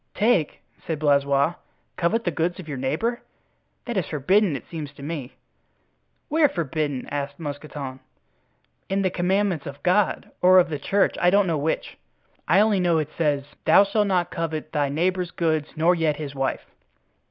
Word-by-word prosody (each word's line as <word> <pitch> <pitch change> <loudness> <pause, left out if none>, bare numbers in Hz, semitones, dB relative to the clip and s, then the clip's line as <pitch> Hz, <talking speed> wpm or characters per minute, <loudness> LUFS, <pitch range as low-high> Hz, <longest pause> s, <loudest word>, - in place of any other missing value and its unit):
"Take!" 210 -8 +1 0.3
said 160 - -1
Blaisois; 140 +1 +2 0.4
"covet 215 +7 0
the 175 - 0
goods 170 +3 -1
of 175 - -9
your 140 -4 -5
neighbor? 195 - -1 0.6
That 240 -3 -3
is 185 - 0
forbidden, 175 +4 +2
it - - -7
seems 155 -4 -6
to 140 - -12
me." 145 -4 -5 0.9
"Where 305 -1 +3
forbidden?" 150 - -2
asked 145 0 -4
Mousqueton. 145 -3 -6 0.9
"In 195 +1 0
the 185 - +1
commandments 185 -3 0
of 140 0 -9
God, 185 +3 +1
or 185 +1 +7
of 180 -2 +5
the 150 -3 -3
church, 200 +7 +1
I 175 - +5
don't 200 +2 +4
know 165 -4 0
which. 155 +3 -2 0.5
I 185 +6 +5
only 210 -2 +3
know 175 -2 +2
it 155 -2 -1
says, 145 -4 +1 0.2
'Thou - - +7
shalt 205 +1 +1
not 180 -3 +1
covet 160 -2 -4
thy 145 -2 0
neighbor's 180 +4 0
goods, 160 -4 0
nor 165 +3 +3
yet 160 -3 +1
his 145 -2 -6
wife. 135 -1 -2
165 Hz, 170 wpm, -24 LUFS, 145-185 Hz, 0.9 s, or